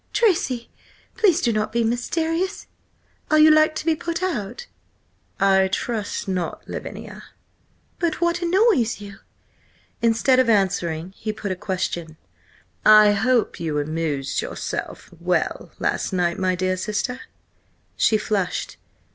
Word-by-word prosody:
"Tracy, 270 - +1 0.4
please 370 -6 +3
do 235 -7 +1
not 215 0 -1
be 235 +1 +1
mysterious! 325 - -1 0.6
Are 310 - +4
you 310 0 +7
like 310 0 +4
to - - -4
be 325 -1 +3
put 335 +3 -4
out?" 335 - -3 0.7
"I 190 -1 +4
trust 210 +2 -3
not, 180 -3 -3
Lavinia." - - -7 0.8
"But 335 -3 -1
what 340 0 +1
annoys 345 - +2
you?" 200 -1 -10 0.8
Instead 230 +3 +3
of 255 -2 +3
answering, 185 -5 +1
he 215 - -3
put 210 -2 -5
a - - -1
question: 175 -4 -4 0.7
"I 215 -1 +8
hope 230 +3 +1
you 160 -3 -2
amused 150 -2 -2
yourself - - -5
well–last - - -1
night, 175 -2 0
my 185 -1 +1
dear 185 +1 -1
sister?" 240 +6 -3 0.7
She 220 - +3
flushed. 205 -3 -2
215 Hz, 125 wpm, -22 LUFS, 185-310 Hz, 0.8 s, I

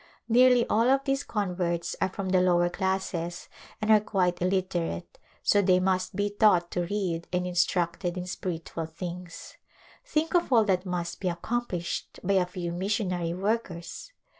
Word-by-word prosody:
Nearly 245 +1 +5
all 230 +3 +3
of 270 +1 +3
these 275 0 0
converts 175 -4 -2
are - - +2
from 190 0 -4
the 185 -1 +4
lower 175 -1 +3
classes 185 -3 -2 0.3
and 215 0 +1
are 215 - +8
quite 185 -4 0
illit 185 +1 +1
erate, 165 - -3 0.2
so 205 - +4
they 185 -2 +4
must 185 0 0
be 205 +1 0
taught 200 -5 +3
to 175 -1 -1
read 180 -4 -2
and 180 0 0
instructed 175 0 0
in 180 - -3
spiritual 165 -3 -4
things. 175 +1 -8 0.5
Think 320 +2 -1
of 350 -5 +2
all 230 -3 +6
that 190 -2 0
must 175 -1 -3
be 190 - -2
accom 235 +8 -2
plished 175 -1 -4
by 200 +2 +1
a 185 -2 +3
few 180 -2 -4
missionary 180 -2 -1
workers 190 - -3
185 Hz, 165 wpm, -28 LUFS, 175-205 Hz, 0.5 s, are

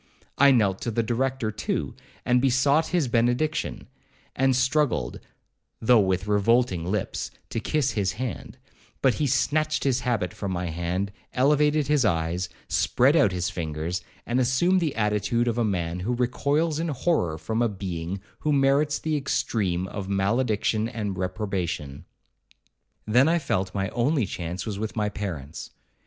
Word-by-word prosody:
I 140 +1 +7
knelt 105 -7 +3
to - - -2
the 115 +1 0
Director 120 0 -1
too, 110 - -3 0.3
and 125 0 +3
besought 140 +4 +3
his 170 -6 +1
benediction, 120 +6 0 0.5
and 135 0 +3
struggled, 130 - +1 0.6
though 115 +1 +5
with 95 -1 +1
revolting 105 -4 +2
lips, 105 -2 -2 0.2
to - - -1
kiss 140 +3 0
his 95 -3 0
hand; 120 -1 -5 0.5
but 130 - +5
he 150 - 0
snatched 155 +4 +1
his 130 -2 +2
habit 115 -8 -1
from 100 -2 -4
my 90 -2 -2
hand, 90 +4 -2 0.2
elevated 150 +3 +3
his 150 -2 +2
eyes, 90 -2 0 0.2
spread 135 +5 +3
out 105 -11 +4
his 90 +1 -2
fingers, 85 +1 -3 0.2
and 120 +2 0
assumed 135 +10 +3
the 155 -4 -1
attitude 110 +2 +1
of 120 0 0
a - - +3
man 90 -4 -1
who 115 +7 -1
recoils 145 +6 0
in 165 - -1
horror 135 - 0
from 110 +7 -2
a 120 - +3
being 95 -2 -4 0.2
who 155 - 0
merits 140 +1 +3
the 155 -1 -2
extreme 100 -10 -1
of 95 0 -6
malediction 110 +2 +1
and 105 -4 -3
reprobation. 90 -7 -3 1.0
Then 125 +6 +4
I 170 - +3
felt 95 - -2
my 95 -1 -1
only 130 +1 +1
chance 90 -1 -5
was 105 -3 -4
with 110 0 -4
my 105 -2 0
parents. 85 -8 -6
115 Hz, 155 wpm, -25 LUFS, 95-135 Hz, 1.0 s, I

